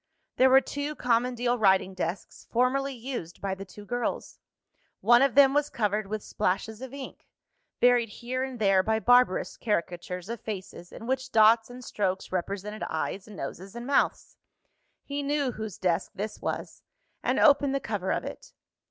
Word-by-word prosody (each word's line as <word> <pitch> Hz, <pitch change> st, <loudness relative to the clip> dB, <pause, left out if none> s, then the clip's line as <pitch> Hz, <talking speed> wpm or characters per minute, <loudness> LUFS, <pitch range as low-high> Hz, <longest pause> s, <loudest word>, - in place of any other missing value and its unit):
There 260 Hz, +1 st, +6 dB
were 265 Hz, +1 st, +7 dB
two 285 Hz, +3 st, -4 dB
common 245 Hz, 0 st, +1 dB
deal 245 Hz, 0 st, 0 dB
writing 190 Hz, -2 st, +3 dB
desks, 180 Hz, 0 st, -5 dB
formerly 265 Hz, +3 st, +1 dB
used 240 Hz, -8 st, -6 dB
by 195 Hz, -1 st, -2 dB
the 195 Hz, +1 st, -7 dB
two 205 Hz, +2 st, -12 dB
girls. 245 Hz, +3 st, -3 dB, 0.6 s
One 240 Hz, +1 st, +5 dB
of 275 Hz, -2 st, +3 dB
them 275 Hz, -1 st, +7 dB
was 290 Hz, 0 st, +1 dB
covered 210 Hz, -2 st, -1 dB
with 215 Hz, +1 st, -4 dB
splashes 215 Hz, +5 st, -2 dB
of 260 Hz, -1 st, -7 dB
ink: 275 Hz, -1 st, -9 dB, 0.5 s
varied 245 Hz, -2 st, +4 dB
here 250 Hz, +4 st, -4 dB
and 265 Hz, -2 st, -5 dB
there 195 Hz, -4 st, +4 dB
by 220 Hz, +3 st, 0 dB
barbarous 245 Hz, -4 st, +3 dB
caricatures 180 Hz, -3 st, -3 dB
of 230 Hz, 0 st, -5 dB
faces, 190 Hz, -4 st, -7 dB
in 230 Hz, -, -9 dB
which 260 Hz, +1 st, -2 dB
dots 225 Hz, +1 st, +5 dB
and 250 Hz, +1 st, -10 dB
strokes 190 Hz, -2 st, -2 dB
represented 200 Hz, +3 st, -3 dB
eyes, 185 Hz, +5 st, -3 dB
noses, 195 Hz, -1 st, -7 dB
and 240 Hz, 0 st, -6 dB
mouths. 280 Hz, +1 st, 0 dB, 0.7 s
He 285 Hz, 0 st, -4 dB
knew 285 Hz, -2 st, 0 dB
whose 220 Hz, -4 st, -6 dB
desk 180 Hz, -1 st, 0 dB
this 210 Hz, +2 st, -5 dB
was, -, -, -4 dB, 0.4 s
and -, -, +1 dB
opened 285 Hz, -2 st, +5 dB
the -, -, +1 dB
cover 205 Hz, -6 st, -3 dB
of -, -, -1 dB
it. -, -, -9 dB
225 Hz, 170 wpm, -28 LUFS, 195-255 Hz, 0.7 s, were